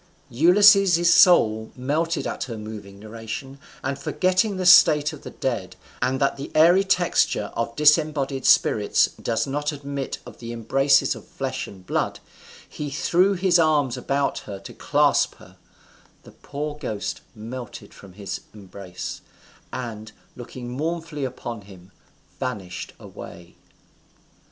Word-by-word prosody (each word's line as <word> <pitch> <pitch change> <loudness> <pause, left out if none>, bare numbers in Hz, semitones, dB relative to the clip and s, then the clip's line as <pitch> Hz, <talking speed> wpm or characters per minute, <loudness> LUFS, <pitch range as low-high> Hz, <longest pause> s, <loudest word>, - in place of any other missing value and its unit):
Ulysses's 175 - +5
soul 110 - +5
melted 155 +6 -1
at - - -3
her 115 -3 -7
moving 105 -2 -9
narration, 115 +6 -8 0.2
and 135 +1 -3
forgetting 185 +6 0
the 185 - -2
state 155 -4 +6
of 150 - -10
the - - -8
dead, 95 -9 -4 0.3
and 130 +2 0
that 140 - +1
the 140 - -7
airy 175 +5 +6
texture 175 - +1
of 115 0 -3
disembodied 150 -3 +2
spirits 105 -1 +3
does 115 - -1
not 145 +2 -2
admit 140 -2 -5
of - - -12
the 115 0 -7
embraces 135 +5 +2
of - - -12
flesh - - -4
and 95 -2 -13
blood, - - -2 0.5
he 150 -1 -6
threw 175 +7 +2
his 180 -2 +2
arms 150 -6 +2
about 140 0 -1
her 100 - -8
to - - -10
clasp - - +2
her: - - -18 0.7
the - - -14
poor 150 +1 -6
ghost 110 -8 -4
melted 120 +2 -9
from 100 -2 -14
his 100 0 -6
embrace, 95 -3 -8 0.5
and, 110 -3 -6 0.2
looking 120 0 -9
mournfully 160 +1 -3
upon 120 -3 -6
him, 95 -1 -16 0.5
vanished 100 -9 -5
away. 85 0 -12
135 Hz, 135 wpm, -23 LUFS, 110-155 Hz, 0.7 s, state